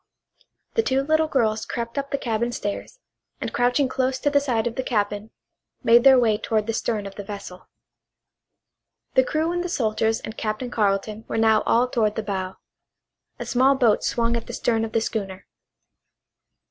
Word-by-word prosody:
The 455 - +3
two 270 -8 +1
little 315 +2 +2
girls 220 -7 +1
crept 235 0 -5
up 280 -1 -3
the 280 - -1
cabin 235 -1 -1
stairs, 205 - -5 0.4
and - - -4
crouching 245 +3 +2
close 260 0 -1
to 290 - +1
the 285 - +4
side 245 -6 -1
of 240 - -1
the 260 - -2
cabin 210 -3 -2 0.5
made 235 +1 +6
their 270 -1 +8
way 220 -4 +3
toward 215 -2 0
the 225 - -2
stern 220 -2 -2
of 195 - -7
the 205 - -7
vessel. 195 -2 -9 1.4
The 260 - +5
crew 315 +4 -1
and 350 0 -1
the 360 - -4
soldiers 220 -5 0
and 220 - -8
Captain 220 +3 -3
Carleton 210 0 0
were - - -3
now 220 -1 +4
all 240 +2 +3
toward 220 -4 0
the 220 - -2
bow. 190 -2 -3 0.8
A - - -5
small 260 +2 +3
boat 235 -6 +3
swung 235 0 0
at 230 - -4
the - - -7
stern 225 -2 0
of 220 - -8
the 225 - +2
schooner. 195 -4 -4
230 Hz, 185 wpm, -23 LUFS, 215-260 Hz, 1.4 s, their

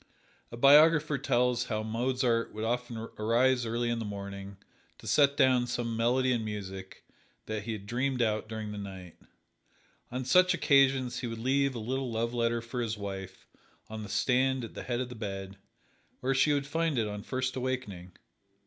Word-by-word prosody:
A 120 - -7
biographer 150 +2 +6
tells 125 -2 +1
how 110 -3 -2
Mozart 120 +1 0
would 110 - -4
often 120 0 -2 0.2
arise 120 +3 +2
early 120 +1 -1
in 120 - -1
the - - -3
morning 100 -1 -7 0.4
to - - -15
set 140 -1 +3
down 130 -3 +4
some 120 -1 -2
melody 125 +3 +2
in 120 -3 0
music 95 -3 -7 0.4
that 110 -1 -4
he 115 - -2
had 100 -2 -7
dreamed 125 +4 -1
out 110 -2 0
during 110 -1 -5
the 105 - -6
night. 95 -4 -8 1.0
On 130 +1 -3
such 180 +7 +5
occasions 135 -3 +3
he 125 - -3
would 115 0 -5
leave 135 +3 +1
a - - -3
little 130 +3 -3
love 115 +1 -1
letter 115 -1 0
for 115 +2 -4
his 115 -2 -2
wife 95 -2 -7 0.5
on 110 0 -5
the 105 - -7
stand 130 +4 +1
at 115 - -7
the - - -6
head 120 0 -2
of 125 - -4
the - - -7
bed, 100 -3 -6 0.6
where 135 +1 0
she 135 +3 +3
would 140 -1 +1
find 160 0 -1
it 110 -2 +1
on 105 0 -5
first 130 +2 -3
awakening. 125 -9 -4
120 Hz, 185 wpm, -30 LUFS, 110-130 Hz, 1.0 s, biographer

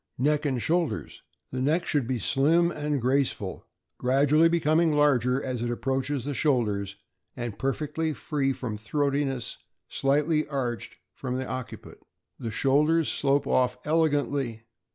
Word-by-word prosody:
Neck 150 +3 +1
and 130 -3 0
shoulders. 170 +5 -1
— - - -45
The 130 - -3
neck 155 +6 +1
should 140 -6 0
be 130 -1 0
slim 160 - +3
and 150 -3 -2
graceful, 130 -6 -1 0.3
gradually 145 +5 +4
becoming 165 -1 +2
larger 135 -4 +3
as 125 -3 -3
it 120 - -1
approaches 135 +2 -2
the 145 - -2
shoulders, 105 -9 0 0.4
and 120 -3 -5
perfectly 150 +4 -1
free 145 -3 -1
from 120 -5 -4
throatiness, 140 +1 -1 0.3
slightly 150 +3 +1
arched 130 -5 -3 0.2
from 125 -1 -4
the 130 - -3
occiput. 130 -1 -7 0.4
The 115 - -4
shoulders 150 +8 +2
slope 140 0 +1
off 125 -1 +2
elegantly. 145 -7 0
140 Hz, 135 wpm, -27 LUFS, 125-150 Hz, 0.4 s, gradually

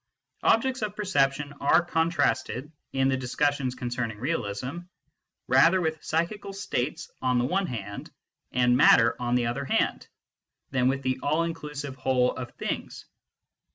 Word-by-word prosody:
Objects 260 +3 +2
of 210 -1 -3
perception 145 -7 0
are 170 +5 +4
con 165 -1 +1
trasted, 135 -2 -1 0.2
in 135 0 +2
the 135 - +2
discussions 130 0 0
concerning 120 -3 -3
realism, 125 +2 -3 0.7
rather 165 +9 +5
with 160 -3 -2
psychical 195 +5 -2
states 155 -8 -3
on 125 -1 +2
the 120 - +2
one 190 +7 0
hand 100 -6 -6 0.4
and 125 0 +3
matter 115 -3 +6
on 120 0 0
the 125 -1 +2
other 125 +4 -2
hand - - 0 0.6
than 130 -2 +2
with 135 +1 0
the 130 0 -1
all 155 +3 +1
inclusive 150 -4 -5
whole 130 -1 +2
of 125 -2 -5
things. - - -5
135 Hz, 145 wpm, -27 LUFS, 125-165 Hz, 0.7 s, matter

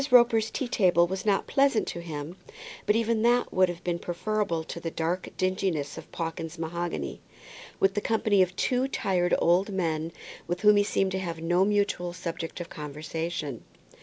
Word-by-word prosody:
Roper's 235 -3 +5
tea 265 - -3
table 180 -7 +4
was 190 +3 -4
not 200 -1 +2
pleasant 275 -5 +3
to - - -5
him, 155 0 -6 0.5
but 210 - +4
even 230 -1 +1
that 240 +1 +3
would 185 -1 +4
have 175 0 -6
been 175 -1 -1
preferable 175 -1 -1
to 170 - -7
the 165 - -3
black 165 +3 -2
dinginess 185 -6 -1
of - - -10
Pawkins's 165 0 -4
mahogany, 165 - -3 0.6
with 195 0 +3
the 205 - -1
company 215 -3 +2
of 185 0 +1
two 255 +6 +1
tired 180 -8 +1
old 180 +4 +3
men, 165 -4 -1 0.4
with 175 +1 -2
whom 210 -1 +6
he 205 - +5
seemed 195 -2 0
to 190 - -1
have 170 -3 -4
no 175 +3 +2
mutual 200 -4 0
subject 165 -1 -5
of 175 - -5
conversation. 150 -2 -5
180 Hz, 175 wpm, -27 LUFS, 165-205 Hz, 0.6 s, whom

